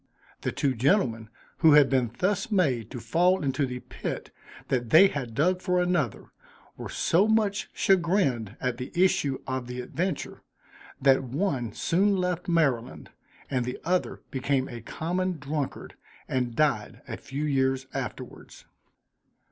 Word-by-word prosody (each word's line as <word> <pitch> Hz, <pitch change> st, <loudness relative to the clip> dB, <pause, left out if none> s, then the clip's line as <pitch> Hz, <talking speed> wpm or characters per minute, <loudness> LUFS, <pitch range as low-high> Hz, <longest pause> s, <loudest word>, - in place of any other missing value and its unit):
The -, -, -1 dB
two 135 Hz, -2 st, 0 dB
gentlemen, 120 Hz, -, +1 dB, 0.3 s
who 160 Hz, -2 st, +6 dB
had 145 Hz, -2 st, +7 dB
been 130 Hz, -4 st, +1 dB
thus 205 Hz, +6 st, 0 dB
made 135 Hz, -, +1 dB
to 125 Hz, -, -6 dB
fall 175 Hz, +10 st, +2 dB
into 135 Hz, 0 st, 0 dB
the 125 Hz, 0 st, -6 dB
pit -, -, -6 dB, 0.4 s
that 120 Hz, -3 st, 0 dB
they 190 Hz, -, +8 dB
had 125 Hz, -8 st, -5 dB
dug 180 Hz, +7 st, +2 dB
for 180 Hz, -1 st, +1 dB
another, 175 Hz, -, -1 dB, 0.4 s
were -, -, -7 dB
so 185 Hz, +6 st, +2 dB
much 215 Hz, -2 st, +1 dB
chagrined 170 Hz, -, +1 dB
at 125 Hz, -2 st, -2 dB
the 125 Hz, 0 st, -6 dB
issue 180 Hz, -7 st, +2 dB
of 130 Hz, -2 st, -3 dB
the 125 Hz, 0 st, -6 dB
adventure, 170 Hz, +6 st, -3 dB, 0.6 s
that 135 Hz, -1 st, +4 dB
one 130 Hz, -, -2 dB
soon 195 Hz, -, +2 dB
left 180 Hz, -1 st, -2 dB
Maryland; 125 Hz, -, 0 dB, 0.4 s
and 130 Hz, -3 st, -1 dB
the 125 Hz, +1 st, -4 dB
other 180 Hz, +2 st, -1 dB
became 135 Hz, 0 st, 0 dB
a 120 Hz, -2 st, -8 dB
common 180 Hz, +8 st, -2 dB
drunkard, 145 Hz, 0 st, -4 dB, 0.3 s
and 125 Hz, -3 st, -1 dB
died 140 Hz, -8 st, 0 dB
a -, -, -4 dB
few 140 Hz, +3 st, -5 dB
years 135 Hz, -2 st, +1 dB
afterwards. -, -, -7 dB
140 Hz, 145 wpm, -27 LUFS, 125-180 Hz, 0.6 s, they